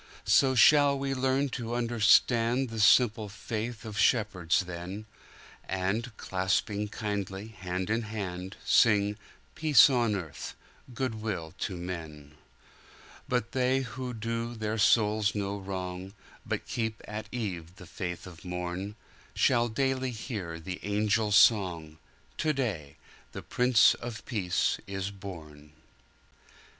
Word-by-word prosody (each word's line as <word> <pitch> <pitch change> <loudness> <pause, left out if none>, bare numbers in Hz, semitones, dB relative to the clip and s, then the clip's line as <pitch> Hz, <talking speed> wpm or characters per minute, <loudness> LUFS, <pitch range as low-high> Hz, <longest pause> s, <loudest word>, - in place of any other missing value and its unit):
So 135 -1 +4
shall 145 +2 +6
we 135 0 -2
learn 135 +1 +1
to 120 -2 -4
understandThe 115 +1 +3
simple 110 -1 +4
faith 110 +2 -5
of 105 -3 -5
shepherds 100 -6 +2
then, 90 +3 -7 0.6
And, 100 +5 -2
clasping 95 +2 -1
kindly 100 -1 -4
hand 95 -1 -4
in 115 +1 +1
hand, 95 -3 -5
Sing, 105 -2 +4 0.4
"Peace 150 -3 +6
on 120 -4 +2
earth, 85 -7 -6 0.4
good 120 -3 -3
will 90 -8 -4
to 95 - -3
men!"But 85 - -7
they 130 +1 +1
who 125 0 -5
do 115 +1 -3
their 110 0 -3
souls 105 0 +3
no 100 0 -2
wrong, 95 -1 -5 0.3
But - - -2
keep 110 -2 -3
at 105 +1 -6
eve 90 -8 -4
the 90 - -12
faith 90 -1 -5
of 90 -2 -12
morn, 90 +3 -4 0.4
Shall 120 -2 +3
daily 130 +2 0
hear 105 -8 -5
the 90 +2 -6
angel 105 +1 +1
song,"To 95 - +1
day 100 - -3 0.4
the - - -7
Prince 125 -2 +4
of 120 -2 -7
Peace 95 -8 0
is 95 0 -3
born!" 80 -7 -10
105 Hz, 120 wpm, -29 LUFS, 95-120 Hz, 0.6 s, shall